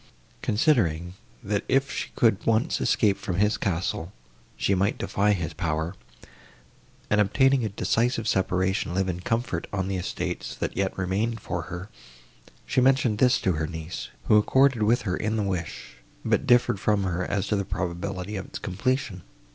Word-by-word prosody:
Considering, 90 - +1 0.3
that, 100 0 -1
if 135 +1 +2
she - - -3
could 110 -5 +3
once 115 +7 +1
escape 105 -4 +2
from 95 -5 -3
his 105 +3 +2
castle, 85 -1 -2 0.5
she 100 - +1
might 100 +4 +1
defy 105 +1 +1
his 85 -5 -1
power, 80 0 -2 1.2
and, 105 0 +5
obtaining 135 +5 +3
a 110 - -1
decisive 115 +3 0
separation, 95 -2 0
live 95 0 +1
in 90 -1 -2
comfort 115 +6 -2
on 95 -2 -1
the 95 -1 -1
estates, 90 - -4
that - - -3
yet 95 -1 -1
remained 100 +5 -1
for 85 -3 -3
her, 90 +2 -6 0.8
she 130 - +1
mentioned 130 -5 +3
this 125 -1 +4
to 95 - +1
her 80 -2 -1
niece, 80 +1 -6
who 105 - +5
accorded 130 +2 +3
with 110 +3 +3
her 90 -4 -1
in 110 +3 -1
the 110 - 0
wish, 90 -10 -4 0.3
but - - +1
differed 120 -5 +4
from 105 -1 +1
her, 90 -1 -1
as 100 +1 -1
to 105 - 0
the 100 - 0
probability 95 +2 -4
of 95 - -4
its - - -7
completion. 100 0 -2
100 Hz, 170 wpm, -26 LUFS, 90-115 Hz, 1.2 s, and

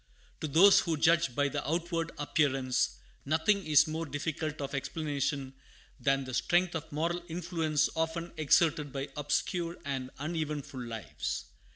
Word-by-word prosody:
To 155 - -2
those 185 +7 +7
who 165 -3 -1
judge 160 -4 +3
by 145 0 +2
the 145 +1 -3
outward 165 0 -1
appearance, 135 -4 +1 0.3
nothing 165 +7 +2
is 155 0 +6
more 160 0 -3
difficult 155 +2 -3
of 140 0 -4
explanation 140 -1 -2 0.5
than 135 0 +2
the 130 -1 -7
strength 175 +7 +2
of 160 -1 -5
moral 170 +4 -1
influence 165 -3 0
often 165 +1 -2
exerted 155 -1 +3
by 135 +1 -4
obscure 165 +4 -1
and 135 -2 -3
uneventful 150 -3 -3
lives. 110 -11 -4
155 Hz, 140 wpm, -31 LUFS, 140-165 Hz, 0.5 s, those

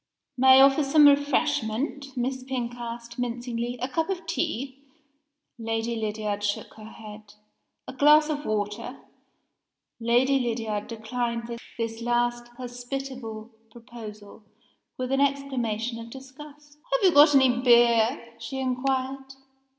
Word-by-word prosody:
"May 260 +1 +7
I - - +8
offer 275 +2 +5
some 295 +2 +5
refreshment?" 280 -2 0
Miss 260 +1 -2
Pink 250 -2 -3
asked, 235 0 -8
mincingly. 240 0 -3
"A - - 0
cup 325 +6 -2
of 365 -3 -3
tea?" 275 -5 -3 0.8
Lady 225 +1 -2
Lydiard 210 -2 -3
shook 205 0 -2
her 215 0 -12
head. 210 -2 -12 0.5
"A - - -7
glass 300 +3 +5
of 295 -2 -3
water?" 215 +4 -3 1.0
Lady 245 +4 +3
Lydiard 225 -4 -2
declined 235 +1 -4 0.2
this 225 0 -4
last 240 0 0
hospitable 245 -2 -6 0.2
proposal 225 -3 -11 0.6
with 255 0 -3
an 270 +1 +2
exclamation 245 -5 -1
of 230 0 -9
disgust. 290 +3 -13
"Have - - +1
you 360 - +3
got 290 0 +7
any 255 -2 +4
beer?" 235 0 +3
she 270 - -6
inquired. 265 +1 -2
245 Hz, 125 wpm, -26 LUFS, 230-275 Hz, 1.0 s, I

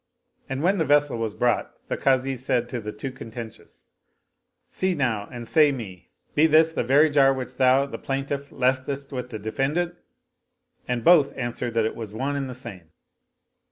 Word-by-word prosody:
And 135 +2 -3
when 190 +2 +2
the - - +3
vessel 145 -3 +2
was 110 -2 -3
brought 120 -1 0
the - - -2
Kazi 135 0 +1
said 125 -1 0
to 120 -1 -4
the 105 0 -5
two 120 +6 -6
contentious, 115 -3 -9 0.4
" - - -45
See 185 -1 0
now 115 -8 -1
and 120 -2 -7
say 150 +3 +5
me: 95 -9 -8 0.2
be 155 +2 +5
this 160 +1 +4
the - - -1
very 140 +6 +5
jar 135 -2 +5
which 130 -1 -6
thou, 130 +1 +4
the 140 - -7
plaintiff, 140 +1 -3
leftest 135 +2 -1
with 125 -2 -5
the 110 - -5
defendant? 140 +11 -1 0.5
" - - -43
and 125 -2 -2
both 150 -4 +5
answered 120 -1 -3
that 115 -1 +2
it 110 - -2
was 110 -3 -7
one 135 +5 -2
and 135 -2 -3
the 125 - -7
same. 100 -10 -10
130 Hz, 190 wpm, -24 LUFS, 120-140 Hz, 0.5 s, say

